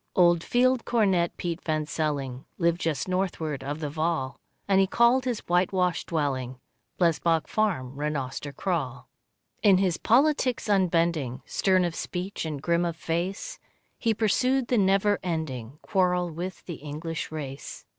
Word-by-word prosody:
Old 175 Hz, -2 st, +5 dB
Field 255 Hz, 0 st, +2 dB
Cornet 190 Hz, -7 st, +1 dB
Piet 175 Hz, -1 st, -3 dB
van 155 Hz, -1 st, 0 dB
Celling 140 Hz, -5 st, -2 dB
Lived 170 Hz, 0 st, +1 dB
just 155 Hz, -2 st, -1 dB
northward 170 Hz, -6 st, -2 dB
of 145 Hz, +3 st, -4 dB
the 150 Hz, -, -2 dB
Vaal, 155 Hz, -4 st, -1 dB, 0.3 s
And 195 Hz, -1 st, +4 dB
he 190 Hz, -, +3 dB
called 240 Hz, +5 st, +4 dB
his 245 Hz, -4 st, -1 dB
white 175 Hz, +1 st, +2 dB
washed 180 Hz, -3 st, 0 dB
dwelling, 130 Hz, -5 st, -2 dB, 0.4 s
Blesbock 165 Hz, -2 st, +2 dB
Farm, 165 Hz, -13 st, -1 dB
Rhenoster 145 Hz, -1 st, -3 dB
Kraal. 140 Hz, -8 st, -3 dB, 0.5 s
In 195 Hz, -3 st, +6 dB
his 185 Hz, -3 st, +1 dB
politics 260 Hz, 0 st, +2 dB
unbending, 170 Hz, -, +1 dB
Stern 185 Hz, -2 st, +2 dB
of 170 Hz, -, -2 dB
speech 180 Hz, +1 st, -4 dB
and 150 Hz, -3 st, -3 dB
grim 170 Hz, 0 st, +2 dB
of 170 Hz, -2 st, -1 dB
face, 175 Hz, -, -3 dB, 0.4 s
He 225 Hz, -2 st, +1 dB
pursued 250 Hz, +4 st, +2 dB
the 245 Hz, -, +3 dB
never 195 Hz, +1 st, +3 dB
ending 150 Hz, -8 st, -4 dB
Quarrel 180 Hz, -2 st, +1 dB
with 180 Hz, +4 st, -6 dB
the 170 Hz, -4 st, -6 dB
English 155 Hz, +3 st, -5 dB
race. 140 Hz, -3 st, -7 dB
170 Hz, 145 wpm, -27 LUFS, 150-195 Hz, 0.5 s, In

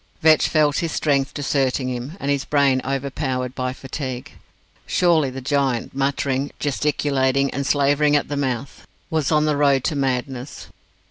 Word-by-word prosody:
Vetch 155 Hz, -1 st, +5 dB
felt 150 Hz, -2 st, +2 dB
his 165 Hz, -1 st, -2 dB
strength 140 Hz, -3 st, +1 dB
deserting 135 Hz, -2 st, 0 dB
him, 130 Hz, +7 st, -5 dB
and 140 Hz, -, -1 dB
his 140 Hz, -1 st, 0 dB
brain 140 Hz, -3 st, +2 dB
overpowered 130 Hz, -1 st, -2 dB
by 130 Hz, -1 st, -2 dB
fatigue. 130 Hz, -1 st, -6 dB, 0.6 s
Surely 165 Hz, -6 st, +3 dB
the 130 Hz, +1 st, -7 dB
giant, 135 Hz, -3 st, 0 dB
muttering, 135 Hz, 0 st, -1 dB
gesticulating, 140 Hz, -2 st, +1 dB
and 140 Hz, +1 st, -3 dB
slavering 145 Hz, +1 st, +3 dB
at 145 Hz, -, +1 dB
the 145 Hz, -, -3 dB
mouth, 135 Hz, -2 st, -3 dB, 0.2 s
was 155 Hz, -3 st, 0 dB
on 155 Hz, -1 st, +3 dB
the 150 Hz, -1 st, +1 dB
road 140 Hz, -3 st, +3 dB
to 155 Hz, -, -1 dB
madness. 130 Hz, -1 st, -3 dB
140 Hz, 150 wpm, -22 LUFS, 130-145 Hz, 0.6 s, Vetch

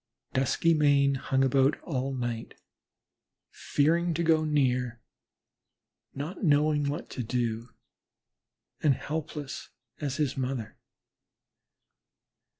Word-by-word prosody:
Duskymane 140 Hz, 0 st, +3 dB
hung 135 Hz, +1 st, +1 dB
about 135 Hz, +1 st, +3 dB
all 135 Hz, -4 st, -2 dB
night, 120 Hz, -2 st, -4 dB, 1.0 s
fearing 165 Hz, +3 st, +1 dB
to 170 Hz, -, 0 dB
go 160 Hz, -1 st, +4 dB
near, 125 Hz, -5 st, +1 dB, 1.2 s
not 150 Hz, +9 st, -5 dB
knowing 150 Hz, -2 st, +3 dB
what 145 Hz, -, -4 dB
to 130 Hz, -, -4 dB
do, 115 Hz, 0 st, -2 dB, 1.1 s
and 145 Hz, -4 st, +4 dB
helpless 150 Hz, -2 st, -5 dB, 0.3 s
as 140 Hz, -3 st, -2 dB
his 150 Hz, -3 st, 0 dB
mother. 130 Hz, -4 st, -3 dB
140 Hz, 90 wpm, -28 LUFS, 130-150 Hz, 1.2 s, go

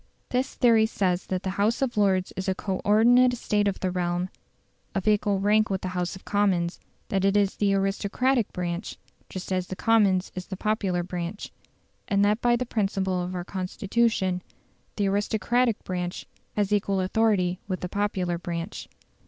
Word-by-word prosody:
This 255 Hz, +2 st, -1 dB
theory 225 Hz, -3 st, +4 dB
says 185 Hz, -4 st, -1 dB
that 185 Hz, 0 st, -2 dB
the 190 Hz, -, -1 dB
House 220 Hz, +3 st, +2 dB
of 265 Hz, -3 st, -1 dB
Lords 190 Hz, -3 st, +2 dB
is 190 Hz, 0 st, -2 dB
a 190 Hz, -, +1 dB
co 190 Hz, -1 st, -3 dB
ordinate 245 Hz, +4 st, +5 dB
estate 210 Hz, -3 st, 0 dB
of 200 Hz, -, -1 dB
the 185 Hz, -, 0 dB
realm, 175 Hz, 0 st, -1 dB, 0.7 s
of 195 Hz, 0 st, -2 dB
equal 205 Hz, -2 st, +2 dB
rank 210 Hz, +2 st, +3 dB
with 190 Hz, -1 st, -1 dB
the 185 Hz, -, -3 dB
House 180 Hz, 0 st, -2 dB
of 190 Hz, -, -13 dB
Commons; 190 Hz, -4 st, +1 dB, 0.3 s
that 195 Hz, -1 st, 0 dB
it 195 Hz, +1 st, +3 dB
is 200 Hz, -1 st, +2 dB
the 200 Hz, -1 st, +2 dB
aristocratic 200 Hz, +5 st, +1 dB
branch, 175 Hz, +2 st, -4 dB, 0.3 s
just 185 Hz, 0 st, -5 dB
as 185 Hz, -1 st, -1 dB
the 190 Hz, -, -5 dB
Commons 200 Hz, -3 st, +3 dB
is 185 Hz, -1 st, -6 dB
the 190 Hz, -, -6 dB
popular 195 Hz, -4 st, 0 dB
branch; 180 Hz, +2 st, -5 dB, 0.6 s
and 200 Hz, 0 st, +3 dB
that 210 Hz, +2 st, +2 dB
by 240 Hz, 0 st, +4 dB
the 250 Hz, +1 st, -1 dB
principle 195 Hz, -5 st, -1 dB
of 180 Hz, +1 st, -4 dB
our 175 Hz, -1 st, -4 dB
Constitution 190 Hz, 0 st, 0 dB, 0.5 s
the 205 Hz, -, 0 dB
aristocratic 220 Hz, +4 st, +1 dB
branch 180 Hz, -1 st, -4 dB, 0.3 s
has 210 Hz, -1 st, +1 dB
equal 200 Hz, -1 st, +1 dB
authority 185 Hz, -2 st, +1 dB
with 185 Hz, -2 st, -3 dB
the 180 Hz, -, -2 dB
popular 185 Hz, -3 st, -1 dB
branch. 170 Hz, +2 st, -5 dB
195 Hz, 175 wpm, -26 LUFS, 185-210 Hz, 0.7 s, ordinate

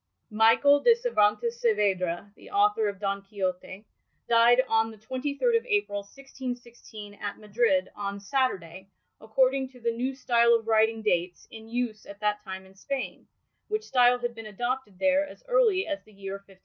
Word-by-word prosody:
Michael 225 Hz, +7 st, +5 dB
de 470 Hz, +6 st, +6 dB
Cervantes 235 Hz, -, +1 dB
Saavedra, 200 Hz, -4 st, 0 dB
the -, -, -15 dB
author 405 Hz, -, +2 dB
of 200 Hz, -2 st, -8 dB
Don 200 Hz, -1 st, -2 dB
Quixote, 195 Hz, 0 st, -5 dB, 0.4 s
died 235 Hz, +2 st, +5 dB
on 225 Hz, 0 st, +2 dB
the 220 Hz, -, -12 dB
23rd 280 Hz, -, 0 dB
of -, -, -20 dB
April, 405 Hz, -, 0 dB
1616, 240 Hz, -3 st, -9 dB
at 205 Hz, 0 st, -6 dB
Madrid, 210 Hz, -3 st, +1 dB
on 200 Hz, -1 st, -4 dB
Saturday, 195 Hz, -6 st, -2 dB, 0.3 s
according 260 Hz, +4 st, +1 dB
to 255 Hz, -1 st, -17 dB
the 235 Hz, 0 st, 0 dB
New 260 Hz, +3 st, -2 dB
Style 235 Hz, -3 st, +4 dB
of 225 Hz, -1 st, -2 dB
writing 220 Hz, 0 st, +2 dB
dates 180 Hz, -3 st, -1 dB
in 220 Hz, 0 st, -11 dB
use 235 Hz, -2 st, -3 dB
at 200 Hz, 0 st, -11 dB
that 210 Hz, 0 st, -1 dB
time 190 Hz, -1 st, -7 dB
in 190 Hz, -, -18 dB
Spain, 265 Hz, +7 st, -5 dB, 0.4 s
which 430 Hz, 0 st, -2 dB
style 245 Hz, -1 st, +4 dB
had 240 Hz, -1 st, -3 dB
been 225 Hz, -1 st, -9 dB
adopted 240 Hz, -1 st, -4 dB
there 285 Hz, +5 st, +3 dB
as -, -, -14 dB
early 470 Hz, -6 st, +3 dB
as 300 Hz, -2 st, -4 dB
the 215 Hz, -, -21 dB
year 195 Hz, -1 st, -7 dB
1582. 195 Hz, -1 st, -12 dB
225 Hz, 170 wpm, -27 LUFS, 200-260 Hz, 0.4 s, de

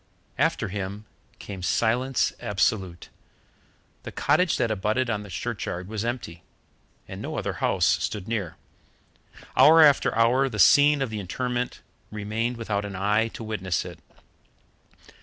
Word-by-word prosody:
After 110 Hz, -, +1 dB
him 100 Hz, +2 st, -5 dB, 0.3 s
came 95 Hz, -2 st, -8 dB
silence 120 Hz, +8 st, +1 dB
absolute. 95 Hz, -3 st, -1 dB, 0.9 s
The -, -, -8 dB
cottage 180 Hz, -3 st, +2 dB
that 115 Hz, -, 0 dB
abutted 110 Hz, +4 st, 0 dB
on 105 Hz, -2 st, -2 dB
the 105 Hz, -, -10 dB
churchyard 95 Hz, -2 st, -4 dB
was 110 Hz, 0 st, -4 dB
empty, 115 Hz, -9 st, -5 dB, 0.7 s
and -, -, -8 dB
no -, -, -5 dB
other -, -, -2 dB
house 90 Hz, -2 st, +2 dB, 0.2 s
stood 95 Hz, +2 st, -4 dB
near. 105 Hz, -7 st, -3 dB, 1.0 s
Hour 155 Hz, +5 st, +8 dB
after 145 Hz, -3 st, +4 dB
hour 125 Hz, +4 st, +3 dB
the 105 Hz, -, -6 dB
scene 145 Hz, +6 st, +5 dB
of 125 Hz, -, -4 dB
the 110 Hz, -, -4 dB
interment 125 Hz, +6 st, -3 dB, 0.3 s
remained 110 Hz, +3 st, -3 dB
without 105 Hz, -3 st, -2 dB
an 100 Hz, -1 st, -6 dB
eye 105 Hz, +4 st, +1 dB
to -, -, -7 dB
witness 95 Hz, -6 st, -2 dB
it. -, -, -9 dB
110 Hz, 140 wpm, -25 LUFS, 100-120 Hz, 1.0 s, Hour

